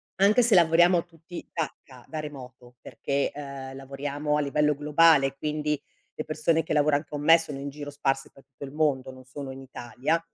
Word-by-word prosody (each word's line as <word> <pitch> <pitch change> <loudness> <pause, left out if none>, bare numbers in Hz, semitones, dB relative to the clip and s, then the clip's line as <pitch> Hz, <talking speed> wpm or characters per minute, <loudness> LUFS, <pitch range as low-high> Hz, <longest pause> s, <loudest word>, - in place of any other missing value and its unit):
Anche 205 +6 +4
se 225 -4 +4
lavoriamo 175 +1 +5
tutti 170 +1 -11
da 160 -2 -2
ca 125 -3 -15
da 155 - -4
remoto, 125 -4 -10
perché, 140 0 -2
ehm, 140 -2 -8
lavoriamo 140 +2 -3
a - - +1
livello 150 +1 +2
globale, 150 -1 +4
quindi 150 -1 -2 0.4
le 155 - -4
persone 160 +1 +1
che - - -3
lavoran 145 0 +2
con 145 0 -5
me 165 +2 +7
sono 150 -4 -6
in 140 +1 -5
giro 145 0 -8
sparse 135 -1 -1
per 135 - -18
tutto 135 0 -13
il 135 - -10
mondo, 140 -4 0
non 130 0 -14
sono 135 +1 -7
in 135 0 -9
Italia. 130 +5 -2
145 Hz, 190 wpm, -26 LUFS, 135-155 Hz, 0.4 s, me